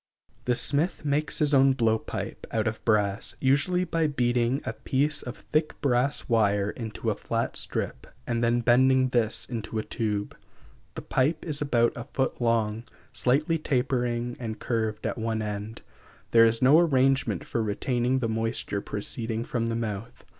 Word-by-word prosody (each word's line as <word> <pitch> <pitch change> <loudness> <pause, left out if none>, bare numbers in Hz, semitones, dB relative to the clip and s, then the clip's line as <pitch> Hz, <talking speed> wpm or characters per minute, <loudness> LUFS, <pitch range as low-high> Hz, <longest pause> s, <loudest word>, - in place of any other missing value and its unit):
The 125 - +2
smith 150 +6 +2
makes 145 +1 0
his 150 -1 +2
own 135 0 +6
blow 115 -4 +2
pipe, - - -6
out 110 -1 -1
of 110 0 -3
brass, 105 -2 +1
usually 145 +7 +2
by 165 -2 0
beating 125 -1 0
a 110 - -2
piece 140 +6 0
of 120 - -7
thick 155 0 -2
brass 135 +1 +1
wire 105 -3 +2
into 110 -4 -4
a - - -2
flat - - -2
strip, - - -3 0.2
and 120 0 -1
then 120 +1 +2
bending 130 +2 +4
this 115 -3 0
into 115 -2 -5
a 110 - -1
tube. 105 -2 -3 0.6
The - - -6
pipe 150 +5 0
is 150 -2 -3
about 120 -5 +2
a 120 - -6
foot 130 -1 -1
long, 115 -1 +1 0.3
slightly 150 +6 +1
tapering 125 -4 -1
and 110 -2 -5
curved 110 -3 -2
at - - -2
one 110 -1 -1
end; 105 +2 -5 0.5
there 115 0 +7
is 115 +2 +1
no 140 +5 +7
arrangement 135 - +2
for 115 - -2
retaining 120 +4 0
the 125 -3 -1
moisture 115 -2 -2
proceeding 110 +3 -3
from 115 -2 -2
the 115 - -1
mouth. 110 -2 -5
120 Hz, 165 wpm, -27 LUFS, 110-135 Hz, 0.6 s, there